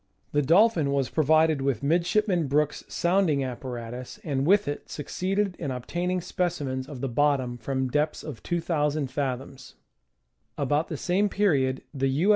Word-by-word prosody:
The 145 Hz, -, +2 dB
Dolphin 165 Hz, -, +4 dB
was 140 Hz, -2 st, 0 dB
provided 155 Hz, -1 st, +3 dB
with 135 Hz, -4 st, -1 dB
Midshipman 175 Hz, +2 st, +2 dB
Brooke's 150 Hz, +2 st, +1 dB
sounding 175 Hz, -6 st, +2 dB
apparatus 125 Hz, -, -6 dB
and 140 Hz, -4 st, -1 dB
with 205 Hz, +3 st, +4 dB
it 145 Hz, -, -4 dB
succeeded 190 Hz, +5 st, -2 dB
in 145 Hz, -, -3 dB
obtaining 175 Hz, +9 st, -2 dB
specimens 145 Hz, -8 st, -2 dB
of 135 Hz, -5 st, -7 dB
the 135 Hz, -, -1 dB
bottom 130 Hz, -1 st, +1 dB
from 130 Hz, +1 st, -2 dB
depths 150 Hz, +4 st, 0 dB
of 110 Hz, -, -7 dB
2,000 155 Hz, -5 st, -1 dB
fathoms. 135 Hz, -1 st, -4 dB, 0.8 s
About 145 Hz, +3 st, +1 dB
the 155 Hz, -, -4 dB
same 190 Hz, +7 st, +1 dB
period 140 Hz, -11 st, +1 dB
the 135 Hz, -1 st, 0 dB
U. 155 Hz, +10 st, +1 dB
145 Hz, 145 wpm, -26 LUFS, 135-175 Hz, 0.8 s, Dolphin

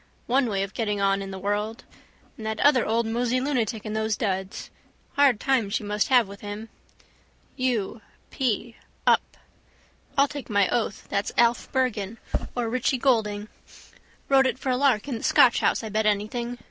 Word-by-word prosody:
One 255 Hz, +1 st, +2 dB
way 195 Hz, -3 st, 0 dB
of 195 Hz, -, -6 dB
getting 210 Hz, -3 st, -1 dB
on 195 Hz, 0 st, +2 dB
in 195 Hz, -, -6 dB
the 190 Hz, -, -6 dB
world. 205 Hz, +4 st, -2 dB, 0.5 s
And 220 Hz, -, -10 dB
that 220 Hz, 0 st, -3 dB
other 275 Hz, -4 st, +5 dB
old 230 Hz, +1 st, +1 dB
mosey 240 Hz, +2 st, 0 dB
lunatic 240 Hz, -6 st, -1 dB
in 215 Hz, -, -4 dB
those 220 Hz, 0 st, 0 dB
duds. 190 Hz, -2 st, -3 dB, 0.4 s
Hard 275 Hz, -6 st, +4 dB
time 250 Hz, -6 st, +1 dB
she 210 Hz, -, -1 dB
must 210 Hz, 0 st, 0 dB
have 245 Hz, -5 st, +4 dB
with 200 Hz, 0 st, -11 dB
him. 210 Hz, +2 st, -7 dB, 0.9 s
U. 240 Hz, -4 st, -1 dB, 0.3 s
p: 235 Hz, -2 st, -2 dB, 0.3 s
up. -, -, +2 dB, 0.8 s
I'll 280 Hz, +1 st, +5 dB
take 285 Hz, -2 st, -8 dB
my 200 Hz, -2 st, +3 dB
oath 220 Hz, -4 st, -1 dB
that's 200 Hz, -, -1 dB
Alf 235 Hz, 0 st, +2 dB
Bergan 230 Hz, -5 st, -1 dB, 0.4 s
or 240 Hz, -2 st, -1 dB
Richie 255 Hz, +3 st, 0 dB
Goulding. 215 Hz, -5 st, +1 dB, 0.8 s
Wrote 270 Hz, -1 st, +5 dB
it 260 Hz, -, -2 dB
for 265 Hz, -, -4 dB
a -, -, +2 dB
lark 255 Hz, -4 st, +2 dB
in 245 Hz, -5 st, -3 dB
the -, -, -11 dB
Scotch 245 Hz, -, +5 dB
house -, -, +1 dB
I 220 Hz, -, -4 dB
bet 215 Hz, +1 st, +1 dB
anything. 235 Hz, +4 st, -1 dB
225 Hz, 175 wpm, -25 LUFS, 205-250 Hz, 0.9 s, other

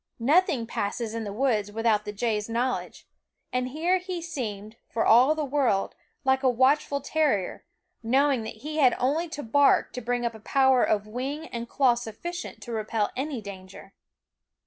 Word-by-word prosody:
Nothing 275 Hz, -1 st, +2 dB
passes 220 Hz, +1 st, -3 dB
in 230 Hz, -1 st, -4 dB
the 205 Hz, -, -4 dB
woods 215 Hz, -3 st, 0 dB
without 220 Hz, -1 st, +1 dB
the 210 Hz, -, -4 dB
jay's 210 Hz, 0 st, -2 dB
knowl 245 Hz, +3 st, 0 dB
edge; -, -, -11 dB, 0.5 s
and 250 Hz, 0 st, 0 dB
here 340 Hz, +7 st, +1 dB
he 365 Hz, -1 st, -5 dB
seemed, 225 Hz, -10 st, -6 dB
for 230 Hz, -, 0 dB
all 255 Hz, +7 st, +6 dB
the 310 Hz, -1 st, -2 dB
world, 260 Hz, -8 st, +1 dB, 0.3 s
like 265 Hz, -1 st, +2 dB
a 265 Hz, -, +3 dB
watchful 275 Hz, +3 st, +2 dB
terrier, 280 Hz, -10 st, 0 dB, 0.4 s
knowing 265 Hz, +2 st, +2 dB
that 220 Hz, +1 st, -8 dB
he 305 Hz, 0 st, -4 dB
had 260 Hz, -5 st, +5 dB
only 310 Hz, +7 st, 0 dB
to 305 Hz, -3 st, -6 dB
bark 280 Hz, +5 st, +3 dB
to 250 Hz, -, -5 dB
bring 245 Hz, +1 st, -1 dB
a 235 Hz, -, 0 dB
power 265 Hz, +2 st, +3 dB
of 210 Hz, -1 st, +1 dB
wing 265 Hz, +8 st, -4 dB
and 235 Hz, 0 st, -6 dB
claw 265 Hz, -3 st, +3 dB
sufficient 240 Hz, +10 st, -6 dB
to 240 Hz, -, -8 dB
repel 215 Hz, -1 st, -1 dB
any 270 Hz, -2 st, -3 dB
danger. 195 Hz, -1 st, -11 dB
245 Hz, 170 wpm, -26 LUFS, 220-285 Hz, 0.5 s, all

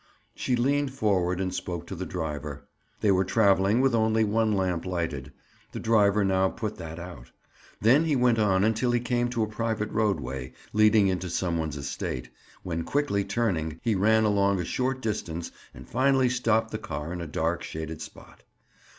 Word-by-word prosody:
She 125 Hz, -, -1 dB
leaned 140 Hz, +3 st, +1 dB
forward 95 Hz, -7 st, +1 dB
and 95 Hz, -1 st, -2 dB
spoke 85 Hz, -2 st, -4 dB
to 90 Hz, -, -7 dB
the 95 Hz, +1 st, -5 dB
driver. 75 Hz, -4 st, -5 dB, 0.3 s
They 105 Hz, -, +4 dB
were 95 Hz, 0 st, +3 dB
traveling 100 Hz, +2 st, +3 dB
with 135 Hz, -2 st, +3 dB
only 110 Hz, -1 st, +3 dB
one 110 Hz, +1 st, +1 dB
lamp 95 Hz, -4 st, 0 dB
lighted; 80 Hz, -7 st, -3 dB, 0.4 s
the -, -, -4 dB
driver 105 Hz, -2 st, +3 dB
now 95 Hz, 0 st, +2 dB
put 110 Hz, 0 st, -5 dB
that 80 Hz, 0 st, -7 dB
out. 85 Hz, -8 st, -9 dB, 0.5 s
Then 130 Hz, +9 st, +4 dB
he 155 Hz, -3 st, +1 dB
went 125 Hz, -3 st, +3 dB
on 95 Hz, -3 st, +3 dB
until 110 Hz, +3 st, +1 dB
he 120 Hz, -, +3 dB
came 120 Hz, 0 st, 0 dB
to 115 Hz, -2 st, 0 dB
a -, -, -1 dB
private 110 Hz, 0 st, -2 dB
roadway, 70 Hz, -, -1 dB, 0.2 s
leading 105 Hz, -1 st, +5 dB
into 90 Hz, -1 st, -1 dB
some 85 Hz, 0 st, -1 dB
one's 80 Hz, -2 st, -3 dB
estate, 65 Hz, -2 st, -4 dB, 0.3 s
when 85 Hz, -2 st, -2 dB
quickly 140 Hz, -, 0 dB
turning, 80 Hz, -9 st, -1 dB
he 115 Hz, -, +2 dB
ran 110 Hz, +3 st, +3 dB
along 100 Hz, -2 st, +2 dB
a 90 Hz, -, -2 dB
short 130 Hz, +5 st, -1 dB
distance 85 Hz, -6 st, -3 dB, 0.2 s
and 60 Hz, 0 st, -12 dB
finally 130 Hz, -1 st, +3 dB
stopped 115 Hz, -2 st, +1 dB
the 110 Hz, -, -3 dB
car 85 Hz, -7 st, -5 dB
in 90 Hz, -, -5 dB
a 85 Hz, -, -5 dB
dark 80 Hz, +3 st, -1 dB
shaded 80 Hz, 0 st, -6 dB
spot. -, -, -12 dB
100 Hz, 180 wpm, -27 LUFS, 85-115 Hz, 0.5 s, leading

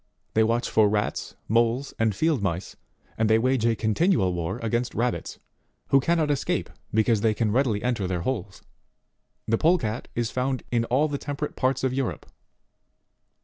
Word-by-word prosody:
57 110 Hz, 0 st, +3 dB
watch 115 Hz, +1 st, 0 dB
for 110 Hz, -2 st, +4 dB
rats, 105 Hz, 0 st, -2 dB
moles, 115 Hz, +4 st, +1 dB
and 110 Hz, -3 st, +2 dB
field 155 Hz, -1 st, +1 dB
mice, 90 Hz, -2 st, -3 dB, 0.4 s
and 110 Hz, -1 st, +2 dB
they 110 Hz, -, +5 dB
wage 125 Hz, 0 st, +2 dB
a 115 Hz, -, +2 dB
continual 110 Hz, -, +2 dB
war 85 Hz, +4 st, -3 dB
against 120 Hz, +2 st, -1 dB
rabbits, 120 Hz, +1 st, -2 dB, 0.5 s
who 135 Hz, -, +6 dB
cannot 155 Hz, +1 st, +1 dB
escape, 140 Hz, -, -1 dB, 0.2 s
because 110 Hz, 0 st, +2 dB
they 110 Hz, -1 st, +2 dB
can 110 Hz, -1 st, 0 dB
readily 115 Hz, -4 st, +1 dB
enter 120 Hz, -6 st, 0 dB
their 90 Hz, -2 st, -2 dB
holes. 100 Hz, -3 st, -4 dB, 0.8 s
The 115 Hz, 0 st, +1 dB
Polecat 135 Hz, -9 st, +1 dB
is 120 Hz, -1 st, -1 dB
found 130 Hz, 0 st, -1 dB
in 115 Hz, -1 st, +1 dB
all 130 Hz, +6 st, +2 dB
the 145 Hz, -2 st, -3 dB
temperate 145 Hz, +1 st, -4 dB
parts 130 Hz, 0 st, 0 dB
of 130 Hz, -1 st, +1 dB
Europe. 135 Hz, -1 st, -2 dB
115 Hz, 165 wpm, -25 LUFS, 110-130 Hz, 0.8 s, who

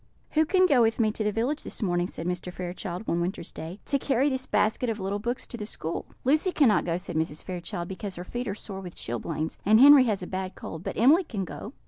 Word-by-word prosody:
"] -, -, -38 dB
"Who 315 Hz, 0 st, +3 dB
can 370 Hz, +2 st, +4 dB
go 280 Hz, -8 st, +5 dB
with 225 Hz, 0 st, +2 dB
me 220 Hz, -2 st, +3 dB
to 215 Hz, -, -3 dB
the 210 Hz, -, +1 dB
village 245 Hz, +8 st, -1 dB
this -, -, -6 dB
morning," 175 Hz, -2 st, +1 dB
said 165 Hz, -, -7 dB
Mr. 180 Hz, 0 st, -3 dB
Fairchild, 180 Hz, +2 st, -5 dB
one 170 Hz, -, +1 dB
winter's 175 Hz, -1 st, -3 dB
day, 165 Hz, +5 st, -7 dB
"to 280 Hz, -, +1 dB
carry 270 Hz, +1 st, +2 dB
this 260 Hz, -1 st, -3 dB
basket 220 Hz, +3 st, +1 dB
of 220 Hz, -1 st, -2 dB
little 195 Hz, +1 st, -2 dB
books 240 Hz, +4 st, -3 dB
to 240 Hz, -, -7 dB
the 210 Hz, -, -5 dB
school?" 165 Hz, -5 st, -5 dB, 0.2 s
"Lucy 310 Hz, +8 st, +3 dB
cannot 235 Hz, -, +4 dB
go," 170 Hz, 0 st, 0 dB
said 180 Hz, -2 st, -6 dB
Mrs. 160 Hz, -1 st, -1 dB
Fairchild, 175 Hz, -1 st, -5 dB
"because 190 Hz, +1 st, -6 dB
her 175 Hz, -, -6 dB
feet 240 Hz, +6 st, -4 dB
are 200 Hz, -, -2 dB
sore 195 Hz, -2 st, -7 dB
with 180 Hz, -2 st, -9 dB
chilblains, 155 Hz, +7 st, -4 dB
and 215 Hz, +2 st, +5 dB
Henry 280 Hz, 0 st, +9 dB
has 205 Hz, -5 st, 0 dB
a -, -, -3 dB
bad 185 Hz, 0 st, -4 dB
cold; 160 Hz, +1 st, -7 dB
but -, -, -4 dB
Emily 290 Hz, -, +6 dB
can 205 Hz, -, -4 dB
go." 215 Hz, +7 st, -8 dB
205 Hz, 255 wpm, -27 LUFS, 180-250 Hz, 0.2 s, Henry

